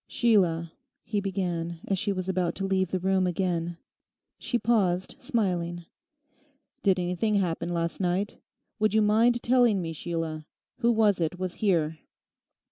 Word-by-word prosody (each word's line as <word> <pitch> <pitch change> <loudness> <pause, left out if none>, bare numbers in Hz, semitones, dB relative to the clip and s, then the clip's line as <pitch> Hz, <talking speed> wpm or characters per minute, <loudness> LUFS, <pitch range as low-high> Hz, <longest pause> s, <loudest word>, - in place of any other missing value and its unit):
'Sheila,' 175 -8 +2 0.3
he 210 -2 -1
began, 175 -4 -2
as 195 -2 0
she 200 - -1
was 185 -2 -3
about 180 -2 0
to 195 - -3
leave 190 -2 +1
the 185 - 0
room 190 0 +2
again. 175 -1 -1 0.6
She 245 - -1
paused, 200 -5 +1
smiling. 180 -9 -1 1.0
'Did 190 -2 +3
anything 180 +4 0
happen 175 -3 0
last 170 -1 -2
night? 185 +3 -1 0.4
Would 215 0 +2
you 220 - +5
mind 230 +3 +3
telling 240 -4 +4
me, 165 -2 -3
Sheila? 160 -1 -4 0.3
Who 235 -1 +3
was 215 -5 +3
it 165 +2 -1
was 185 -1 -3
here? 165 -6 +1
185 Hz, 145 wpm, -27 LUFS, 170-210 Hz, 1.0 s, you